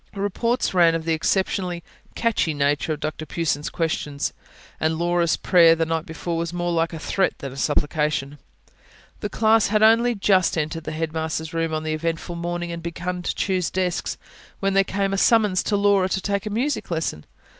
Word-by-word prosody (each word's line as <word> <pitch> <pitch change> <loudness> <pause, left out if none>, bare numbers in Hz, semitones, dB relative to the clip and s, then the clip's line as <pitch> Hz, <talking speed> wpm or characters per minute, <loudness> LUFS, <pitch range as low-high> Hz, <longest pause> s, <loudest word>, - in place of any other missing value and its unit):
Reports 205 +5 -1
ran 170 -2 +5
of 165 -1 -3
the 165 - +1
exceptionally 180 +1 0 0.3
"catchy" 220 -9 0
nature 145 +2 +1
of 150 - -6
Dr 155 +1 -4
Pughson's 155 -2 -2
questions; 150 -3 -2 0.5
and 160 0 0
Laura's 170 0 +1
prayer, 170 -3 +5
the 165 0 0
night 160 0 -2
before, 165 +1 -4
was 170 0 -2
more 175 0 -2
like 165 -1 +1
a 165 - -6
threat 190 +4 0
than 135 -2 -7
a - - -10
supplication. 145 0 -1 0.8
The 210 - -3
class 220 +1 +3
had 215 +1 +2
only 230 +2 +5
just 190 -3 +2
entered 160 +1 -2
the - - -3
Headmaster's 160 0 -3
room 165 -1 -1
on 155 0 -2
the 155 0 -2
eventful 165 +2 -3
morning, 175 0 -3
and 170 0 -5
begun 175 +2 -4
to - - -2
choose 185 -3 0
desks, 180 -2 -2 0.4
when 195 0 0
there 195 0 +5
came 195 0 -1
a 195 - +1
summons 210 -5 +4
to 210 - -1
Laura 200 -2 +3
to 190 - 0
take 200 +2 -2
a - - -1
music 250 +8 -1
lesson. 160 - -2
170 Hz, 190 wpm, -23 LUFS, 160-195 Hz, 0.8 s, ran